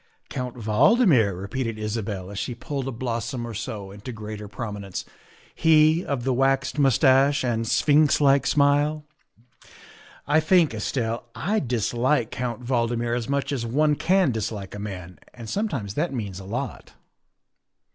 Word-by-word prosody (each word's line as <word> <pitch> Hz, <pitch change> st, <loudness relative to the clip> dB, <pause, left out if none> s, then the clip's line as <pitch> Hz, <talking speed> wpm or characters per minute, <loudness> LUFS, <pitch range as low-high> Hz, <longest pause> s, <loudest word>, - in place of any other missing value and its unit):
" -, -, -41 dB
Count 125 Hz, -2 st, -4 dB
Valdmir," 115 Hz, -, +3 dB
repeated 115 Hz, +3 st, -3 dB
Isabel 105 Hz, -3 st, -4 dB
as 100 Hz, -, -5 dB
she 125 Hz, -, -3 dB
pulled 135 Hz, +2 st, -4 dB
a -, -, -2 dB
blossom 120 Hz, 0 st, -3 dB
or 115 Hz, -, -6 dB
so 100 Hz, -2 st, -6 dB
into 105 Hz, +5 st, -8 dB
greater 105 Hz, -2 st, -7 dB
prominence, 100 Hz, -3 st, -6 dB, 0.2 s
" -, -, -27 dB
he 160 Hz, +1 st, +4 dB
of 135 Hz, -4 st, -3 dB
the 130 Hz, 0 st, +1 dB
waxed 135 Hz, +2 st, +1 dB
mustache 135 Hz, 0 st, +4 dB
and 115 Hz, -2 st, -1 dB
sphinx 150 Hz, +4 st, +4 dB
like 140 Hz, -1 st, +4 dB
smile. 145 Hz, +1 st, +2 dB, 1.2 s
I 150 Hz, +2 st, +3 dB
think, 160 Hz, -3 st, +3 dB
Estelle, 115 Hz, +1 st, -2 dB
I 210 Hz, +8 st, 0 dB
dis 120 Hz, -, -1 dB
like 120 Hz, 0 st, +1 dB
Count 125 Hz, -1 st, -4 dB
Valdmir 120 Hz, -1 st, 0 dB
as 120 Hz, +1 st, -3 dB
much 140 Hz, +1 st, -1 dB
as 135 Hz, -5 st, -2 dB
one 150 Hz, +6 st, +2 dB
can 185 Hz, 0 st, +2 dB
dislike 105 Hz, -3 st, -4 dB
a 105 Hz, -, -6 dB
man 90 Hz, -4 st, -7 dB, 0.2 s
and 115 Hz, -2 st, -9 dB
sometimes 140 Hz, -, -2 dB
that 160 Hz, +8 st, -1 dB
means 100 Hz, -8 st, -4 dB
a 95 Hz, -, -10 dB
lot." 125 Hz, +7 st, -5 dB
125 Hz, 155 wpm, -24 LUFS, 110-145 Hz, 1.2 s, he